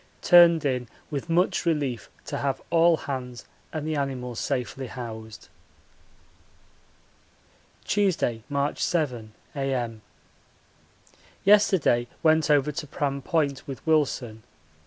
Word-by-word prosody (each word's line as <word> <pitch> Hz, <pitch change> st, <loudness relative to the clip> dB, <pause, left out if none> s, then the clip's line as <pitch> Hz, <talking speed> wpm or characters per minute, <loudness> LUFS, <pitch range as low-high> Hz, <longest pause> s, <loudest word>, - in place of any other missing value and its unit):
Turned 170 Hz, -3 st, +7 dB
in 125 Hz, -3 st, -1 dB, 0.2 s
with 145 Hz, +2 st, -4 dB
much 175 Hz, +3 st, +2 dB
relief 145 Hz, -8 st, -1 dB, 0.2 s
to -, -, -4 dB
have 135 Hz, -2 st, -1 dB
all 165 Hz, 0 st, +5 dB
hands 125 Hz, -5 st, -6 dB, 0.3 s
and 155 Hz, -1 st, -4 dB
the 155 Hz, -, -1 dB
animals 125 Hz, -4 st, -3 dB
safely 130 Hz, +1 st, -3 dB
housed. 110 Hz, -3 st, -8 dB, 2.4 s
Tuesday, 185 Hz, -, +1 dB
March 140 Hz, 0 st, -1 dB
7, 125 Hz, -10 st, -1 dB, 0.2 s
A.M. 125 Hz, -5 st, -2 dB, 1.4 s
Yesterday 190 Hz, -12 st, +4 dB, 0.2 s
went 160 Hz, -1 st, +4 dB
over 145 Hz, 0 st, +3 dB
to 150 Hz, +1 st, -5 dB
Pram 140 Hz, 0 st, -2 dB
Point 145 Hz, -3 st, -1 dB
with 135 Hz, -2 st, -8 dB
Wilson. 135 Hz, -8 st, 0 dB
140 Hz, 105 wpm, -26 LUFS, 125-160 Hz, 2.4 s, Turned